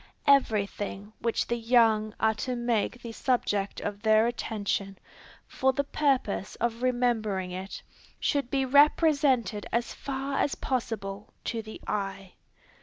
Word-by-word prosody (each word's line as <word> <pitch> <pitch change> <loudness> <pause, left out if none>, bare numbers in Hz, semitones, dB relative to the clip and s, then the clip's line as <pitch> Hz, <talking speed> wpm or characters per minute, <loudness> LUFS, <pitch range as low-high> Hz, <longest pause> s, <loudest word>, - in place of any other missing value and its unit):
Every 260 -8 +4
thing 205 +1 -7
which 230 -1 0
the 235 - -1
young 225 -2 +3
are 220 0 +3
to 250 +4 -3
make 240 0 -1
the 235 - -6
subject 210 -5 0
of 205 0 -4
their 220 0 +4
attention, 205 -4 -2 0.5
for 265 0 +1
the 280 - 0
purpose 275 -9 0
of 235 0 -2
remembering 225 -7 0
it, 185 +2 -6 0.4
should 280 -4 0
be 270 0 +1
represented 280 - +3
as 235 +1 -1
far 275 0 -3
as 285 - +1
possible 210 -5 -4
to 230 -2 -2
the 220 0 -10
eye. 195 -2 -3
230 Hz, 135 wpm, -28 LUFS, 205-255 Hz, 0.5 s, Every